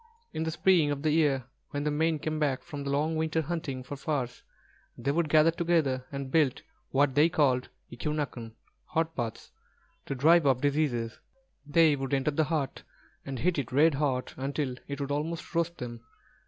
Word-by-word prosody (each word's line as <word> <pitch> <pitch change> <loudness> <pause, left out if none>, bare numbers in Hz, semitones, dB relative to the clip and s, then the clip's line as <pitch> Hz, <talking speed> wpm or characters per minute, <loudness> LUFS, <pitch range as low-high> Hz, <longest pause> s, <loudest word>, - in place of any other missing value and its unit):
In 155 - -3
the - - 0
spring 165 -1 +3
of 145 0 -2
the 155 - +2
year 145 -4 +2 0.3
when 145 0 -3
the 150 - 0
men 160 +2 +1
came 155 +1 -3
back 140 -4 0
from 145 -5 -6
their 140 - -2
long 150 +3 +1
winter 160 0 0
hunting 155 -5 -4
for 145 - -6
furs, 135 -4 -3 0.6
they 140 - 0
would 160 +1 0
gather 155 +2 +6
together 160 -7 +1
and 140 -1 -5
build 150 -5 +2 0.3
what 140 0 +2
they 150 +4 +5
called 130 -6 +2 0.2
eqū'nāk'n, 125 -4 -4 0.3
hot 165 0 -1
baths, 115 -2 -4 0.6
to 140 - -2
drive 160 +3 +5
off 130 -2 +3
their 145 - +3
diseases. 120 -7 -1 0.5
They 155 0 +5
would 135 0 -1
enter 135 +2 +1
the 155 +2 +1
hut, 145 -4 -2 0.5
and 135 -1 -4
heat 170 +4 +1
it 135 - -4
red 150 +4 +5
hot 135 -3 -1
until 140 0 -2
it 140 0 -5
would 140 0 -3
almost 160 +4 -3
roast 170 0 0
them. 120 -2 -6
145 Hz, 185 wpm, -29 LUFS, 135-160 Hz, 0.6 s, gather